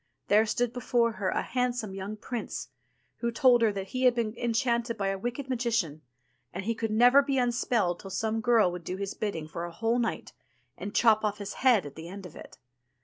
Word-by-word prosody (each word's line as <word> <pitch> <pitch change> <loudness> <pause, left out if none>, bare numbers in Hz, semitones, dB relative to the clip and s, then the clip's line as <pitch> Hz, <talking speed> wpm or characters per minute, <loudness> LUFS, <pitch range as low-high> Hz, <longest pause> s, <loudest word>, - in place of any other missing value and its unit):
there 215 +2 +5
stood 240 +2 0
before 240 -1 +1
her 200 -4 -2
a - - -1
handsome 245 -5 -2
young 195 +2 -5
prince, 235 +2 -5 0.5
who 235 - -1
told 240 +1 +4
her 225 -2 +4
that 195 -1 -5
he 255 0 -1
had 250 -1 +5
been 225 -3 -1
enchanted 235 0 0
by 195 -1 0
a 195 - -1
wicked 240 +5 -4
magician, 230 - -1 0.5
and 190 - -6
he 230 - +1
could 225 0 -3
never 245 +6 +6
be 275 -1 -1
unspelled 235 -7 +1
till 195 - -9
some 220 +3 -1
girl 225 -6 +4
would 175 -1 -7
do 180 +3 -4
his 200 0 -4
bidding 185 -8 -4
for 170 +2 -6
a 175 - -5
whole 225 +7 0
night, 235 - -3 0.4
and 205 - -7
chop 220 -2 +4
off 210 -1 0
his 205 -1 -6
head 245 - +4
at 145 - -8
the 160 +1 -9
end 195 +2 -8
of 180 - -11
it. - - -12
225 Hz, 215 wpm, -28 LUFS, 195-240 Hz, 0.5 s, never